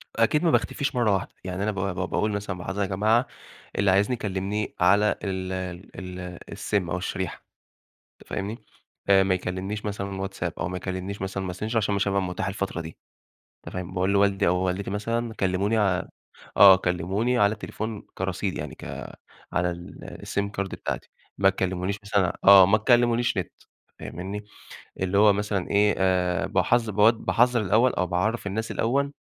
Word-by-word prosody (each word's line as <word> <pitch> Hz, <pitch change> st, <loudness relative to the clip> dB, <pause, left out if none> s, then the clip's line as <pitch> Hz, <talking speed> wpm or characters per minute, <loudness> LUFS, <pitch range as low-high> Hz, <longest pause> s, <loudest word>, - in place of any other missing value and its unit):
أكيد 115 Hz, +8 st, +2 dB
ما 170 Hz, -, +4 dB
باختفيش 140 Hz, -3 st, 0 dB
مرّة 120 Hz, -4 st, +3 dB
واحدة. 95 Hz, -, -1 dB
يعني 95 Hz, +1 st, -3 dB
أنا 110 Hz, -, +1 dB
ب 100 Hz, -, -5 dB
ب 95 Hz, -1 st, -2 dB
باقول 105 Hz, 0 st, 0 dB
مثلًا: 100 Hz, -2 st, -3 dB
"مُلاحظة 95 Hz, +3 st, -4 dB
يا 100 Hz, -, +1 dB
جماعة، 110 Hz, +6 st, +2 dB, 0.5 s
اللي 100 Hz, -1 st, +3 dB
عايزني 100 Hz, +6 st, +3 dB
يكلّمني 105 Hz, -1 st, -3 dB
على 100 Hz, +4 st, +4 dB
ال 95 Hz, -1 st, -3 dB, 0.4 s
ال 90 Hz, -1 st, -7 dB
الSIM 95 Hz, -4 st, -1 dB
أو 90 Hz, -, -1 dB
الشريحة." 95 Hz, 0 st, -4 dB, 0.8 s
أنت -, -, -18 dB
فاهمني؟ 105 Hz, +5 st, -4 dB, 0.4 s
آآ 95 Hz, -1 st, +6 dB
ما 95 Hz, -1 st, +2 dB
يكلّمنيش 95 Hz, +4 st, -4 dB
مثلًا 100 Hz, -1 st, -3 dB
WhatsApp 100 Hz, -, -4 dB
أو -, -, -2 dB
ما 90 Hz, -, -4 dB
يكلّمنيش 95 Hz, +2 st, -5 dB
مثلًا 95 Hz, -1 st, -3 dB
Messenger 110 Hz, +5 st, -4 dB
عشان 105 Hz, -2 st, +1 dB
ما 100 Hz, -, 0 dB
هابقى 100 Hz, 0 st, +1 dB
مُتاح 95 Hz, +1 st, -3 dB
الفترة 100 Hz, -3 st, -3 dB
دي. 80 Hz, 0 st, -8 dB, 0.7 s
أنت -, -, -8 dB
فاهم؟ 90 Hz, 0 st, -5 dB
باقول 95 Hz, +1 st, 0 dB
لوالدي 100 Hz, -1 st, +3 dB
أو 90 Hz, -, +3 dB
والدتي 95 Hz, +2 st, -1 dB
مثلًا: 115 Hz, +3 st, -2 dB
"كلّموني 100 Hz, +2 st, 0 dB
ع" 95 Hz, -4 st, +2 dB, 0.5 s
آه، 95 Hz, -2 st, +10 dB
"كلموني 95 Hz, +8 st, 0 dB
على 100 Hz, 0 st, +4 dB
التليفون 110 Hz, -1 st, -6 dB
كرصيد 95 Hz, 0 st, -2 dB
يعني -, -, -6 dB
ك -, -, -14 dB, 0.7 s
على 90 Hz, 0 st, +1 dB
ال 85 Hz, 0 st, -9 dB
الSIM 100 Hz, 0 st, -1 dB
Card 100 Hz, -, 0 dB
بتاعتي -, -, -5 dB, 0.3 s
ما 95 Hz, 0 st, +5 dB
تكلّمونيش 95 Hz, +1 st, -2 dB
مثلًا" 100 Hz, -4 st, +1 dB
آه. 100 Hz, -1 st, +10 dB
"ما 105 Hz, +4 st, +4 dB
تكلّمونيش 120 Hz, +1 st, +3 dB
نِت -, -, -2 dB, 0.5 s
فاهمينّي؟" 95 Hz, +4 st, -6 dB, 0.6 s
اللي 95 Hz, +1 st, +1 dB
هو 105 Hz, 0 st, +7 dB
مثلًا 100 Hz, -2 st, -2 dB
إيه، 105 Hz, 0 st, +4 dB
آآ 95 Hz, 0 st, +1 dB
باحذ 115 Hz, -2 st, +2 dB
بود 105 Hz, +3 st, +5 dB
باحذَّر 120 Hz, 0 st, +3 dB
الأول 110 Hz, +5 st, +3 dB
أو 90 Hz, -, 0 dB
باعرّف 100 Hz, +5 st, -1 dB
الناس 110 Hz, +3 st, -3 dB
الأول 140 Hz, +5 st, 0 dB
100 Hz, 170 wpm, -25 LUFS, 95-105 Hz, 0.8 s, آه